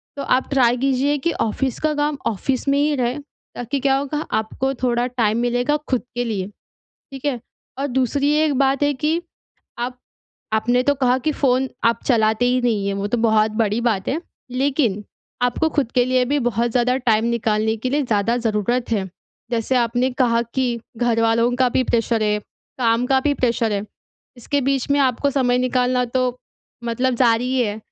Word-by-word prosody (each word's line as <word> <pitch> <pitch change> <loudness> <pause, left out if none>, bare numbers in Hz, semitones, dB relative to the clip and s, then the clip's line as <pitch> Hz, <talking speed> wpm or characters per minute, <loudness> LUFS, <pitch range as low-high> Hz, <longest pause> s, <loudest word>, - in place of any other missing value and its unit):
तो 280 - -4
आप 255 - +1
ट्राई 250 -3 +3
कीजिए 275 +3 +1
कि 335 +5 -1
ऑफ़िस 250 +3 -2
का 310 -1 0
काम 295 0 0
ऑफ़िस 255 +6 -2
में 280 - +3
ही 295 0 +2
रहे 250 +1 -1 0.4
ताकि 245 +3 -3
क्या 270 0 +2
होगा 285 +2 -3
आपको 260 +5 -1
थोड़ा 240 -1 +1
टाइम 230 -3 0
मिलेगा 245 +4 +1
ख़ुद 255 -2 +1
के 245 - 0
लिए, 200 -5 -2 0.7
ठीक 270 +1 -9
है? 265 -5 -1 0.4
और 280 - -1
दूसरी 275 +2 +1
एक 295 -3 +1
बात 275 0 +2
है 290 0 +3
कि 310 +5 0 0.6
आप 250 +1 -4 0.5
आपने 245 +3 +2
तो 285 +2 +2
कहा 255 -2 +2
कि 305 +4 -1
फ़ोन 265 -2 +1 0.2
आप 230 0 +2
चलाते 220 -2 +2
ही 250 +1 +2
नहीं 215 -5 0
है 200 - -1
वो 200 +1 -2
तो 240 +3 0
बहुत 220 -1 +3
बड़ी 215 +2 0
बात 220 -5 0
है 300 +5 -1 0.3
लेकिन 255 -6 0 0.4
आपको 285 +6 +1
ख़ुद 280 -7 -1
के 245 -1 +3
लिए 255 0 +2
भी 290 +3 +1
बहुत 235 +2 0
ज़्यादा 250 +2 +2
टाइम 230 -4 +1
निकालने 220 -2 0
के 250 +3 -3
लिए 290 +2 +1
ज़्यादा 230 -1 +1
ज़रूरत 235 +1 -1
है। 200 -4 -1 0.4
जैसे 235 +2 0
आपने 245 +2 +1
कहा 235 -2 +3
कि 250 -3 0 0.2
घरवालों 230 0 +2
का 255 -1 +3
भी 255 - +1
प्रेशर 230 -1 0
है, 210 0 +1 0.4
काम 235 0 +2
का 265 0 +3
भी 285 +1 +1
प्रेशर 235 -4 0
है, 200 -1 -1 0.5
इसके 280 +4 -1
बीच 270 0 -1
में 285 - +3
आपको 270 +1 +1
समय 250 -3 +1
निकालना 250 0 +1
तो 250 0 -1 0.5
मतलब 250 +2 0
ज़ारी 245 +1 +2
है 210 -2 -1
245 Hz, 185 wpm, -21 LUFS, 230-270 Hz, 0.7 s, ट्राई